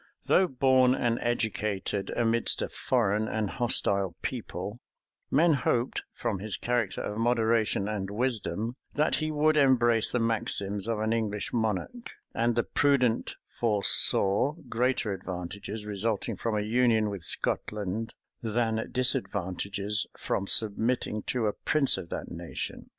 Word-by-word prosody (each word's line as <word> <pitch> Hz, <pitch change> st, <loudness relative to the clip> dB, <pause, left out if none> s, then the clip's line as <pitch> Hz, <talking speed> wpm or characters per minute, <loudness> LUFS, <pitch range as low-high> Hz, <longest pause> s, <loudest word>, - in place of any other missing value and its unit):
Though 190 Hz, -, +4 dB
born 130 Hz, -2 st, +3 dB
and 120 Hz, -2 st, 0 dB
educated 110 Hz, -4 st, -1 dB
amidst 115 Hz, 0 st, +1 dB
a -, -, -3 dB
foreign 110 Hz, -4 st, 0 dB
and 110 Hz, -3 st, -2 dB
hostile 100 Hz, -7 st, +1 dB
people, 110 Hz, -3 st, -5 dB, 0.5 s
men 160 Hz, +4 st, +4 dB
hoped, 125 Hz, -2 st, 0 dB
from 100 Hz, -, -3 dB
his 105 Hz, 0 st, -2 dB
character 120 Hz, -5 st, -1 dB
of 105 Hz, +1 st, -4 dB
moderation 115 Hz, -3 st, +1 dB
and 100 Hz, -2 st, -3 dB
wisdom, 115 Hz, 0 st, -1 dB, 0.2 s
that 150 Hz, +2 st, +2 dB
he 155 Hz, 0 st, -1 dB
would 155 Hz, 0 st, +2 dB
embrace 120 Hz, -5 st, +4 dB
the -, -, -1 dB
maxims 105 Hz, -3 st, -1 dB
of 115 Hz, -1 st, 0 dB
an 110 Hz, +1 st, 0 dB
English 105 Hz, -3 st, -2 dB
monarch; 110 Hz, -, -2 dB, 0.2 s
and 115 Hz, 0 st, +1 dB
the 120 Hz, -, +2 dB
prudent 130 Hz, -5 st, +1 dB
foresaw 105 Hz, +2 st, +3 dB
greater 120 Hz, -3 st, 0 dB
advantages 95 Hz, +3 st, -5 dB
resulting 105 Hz, +1 st, -2 dB
from 115 Hz, -2 st, -2 dB
a -, -, 0 dB
union 110 Hz, -1 st, +2 dB
with 100 Hz, -4 st, -6 dB
Scotland, 105 Hz, +5 st, -1 dB, 0.3 s
than 115 Hz, 0 st, -1 dB
disadvantages 100 Hz, -4 st, -1 dB
from 100 Hz, -, -2 dB
submitting 110 Hz, +1 st, +1 dB
to 120 Hz, -3 st, 0 dB
a 105 Hz, -, +1 dB
prince 150 Hz, -3 st, +2 dB
of 85 Hz, -, -9 dB
that -, -, -5 dB
nation. -, -, -6 dB
115 Hz, 135 wpm, -28 LUFS, 105-125 Hz, 0.5 s, Though